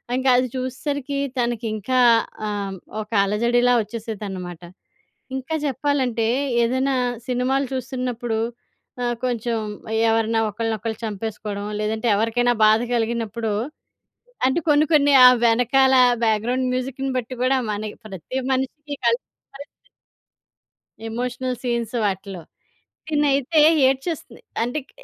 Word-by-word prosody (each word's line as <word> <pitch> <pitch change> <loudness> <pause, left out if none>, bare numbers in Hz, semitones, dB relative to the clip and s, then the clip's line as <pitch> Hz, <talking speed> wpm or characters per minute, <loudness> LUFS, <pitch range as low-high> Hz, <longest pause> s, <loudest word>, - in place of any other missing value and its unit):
ఇంకది 255 -1 +3
చూసేసరికి 275 +2 -3 0.2
తనకింకా 235 0 -1 0.5
ఆహ్, 200 -2 -3 0.3
ఒక 210 - -10
అలజడిలా 240 +4 +2
ఒచ్చేసేదనమాట. 200 -6 -6 0.7
ఇంకా 265 +5 -3
జెప్పాలంటే, 260 -4 0 0.4
ఏదైనా 260 +3 +1 0.3
సినిమాలు 255 +2 0
చూస్తున్నప్పుడు 245 -3 -3 0.6
ఆహ్, 240 0 0
కొంచెం 235 -2 -1 0.5
ఎవరన్నా 225 0 +2
ఒకరినొలు 220 0 -3
చంపేసుకోవడం, 210 -1 -5
లేదంటే 220 +2 -1
ఎవరికైనా 240 +2 +1
బాధ 215 +1 +5 0.2
కలిగినప్పుడు 225 -1 -1 0.9
అంటే 265 +6 +2
కొన్ని 295 +1 +5
కొన్ని 290 -2 +5
ఆ - - +12 0.2
వెనకాల 250 +3 +4 0.3
బ్యాక్‌గ్రౌండ్ 230 +4 +1
మ్యూజిక్‌ని 265 +1 -3
బట్టి 255 +1 -4
గూడా 260 +1 +3
మనకి 210 0 -4
ప్రతి 195 +5 -6
మనిషికి 285 +3 -2
కల్ 235 0 +4 0.4
కల్ 285 +1 -8 1.4
ఎమోషనల్ 250 +2 -3
సీన్స్ 235 -2 -2
వాటిలో. 190 -2 -3 0.7
తినైతే 290 +1 +2 0.3
ఏడ్చేస్తుంది. 270 -2 -3 0.2
అంటే 245 +6 -1
క్ - - -21
240 Hz, 100 wpm, -22 LUFS, 220-260 Hz, 1.4 s, ఆ